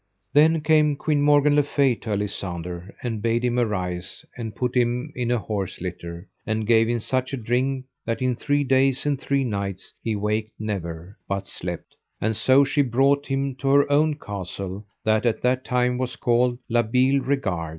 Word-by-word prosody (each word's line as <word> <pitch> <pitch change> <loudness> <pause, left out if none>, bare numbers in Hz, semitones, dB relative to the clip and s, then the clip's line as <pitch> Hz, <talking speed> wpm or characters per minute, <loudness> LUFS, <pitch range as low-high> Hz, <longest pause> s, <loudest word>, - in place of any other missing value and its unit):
Then 155 +2 +5
came 150 -1 +3
Queen 150 0 0
Morgan 145 0 +4
le 145 - +6
Fay 140 -2 +2
to 115 - -8
Alisander, 90 -3 -4
and 115 -4 -3
bade 115 +2 +1
him 125 0 +1
arise, 95 -5 -3
and 115 -3 -6
put 125 -1 -1
him 125 +4 0
in 120 -1 -2
an 125 - +2
horse 100 -2 -4
litter, 85 0 -6 0.2
and 110 0 -2
gave 115 0 +4
him 120 - +1
such 130 +4 -1
a - - -1
drink 130 +3 -1 0.2
that 115 0 -2
in 130 -1 +1
three 145 +4 0
days 135 0 +2
and 140 -2 0
three 140 -1 +1
nights 100 -5 -4
he 110 -2 -1
waked 105 +1 -1
never, 90 -3 -5
but 100 0 -2
slept; 85 -1 -6 0.2
and 110 +1 0
so 130 +6 +5
she 140 +1 +2
brought 135 +3 +2
him 135 0 -1
to 135 - -4
her 140 +1 +4
own 150 +1 +3
castle 100 - -6 0.2
that 110 0 +2
at 115 - -1
that 125 +1 +2
time 125 0 +1
was 130 0 -2
called 120 0 +2
La 120 0 +3
Beale 130 +4 +2
Regard. 100 - -1
120 Hz, 185 wpm, -24 LUFS, 105-135 Hz, 0.2 s, le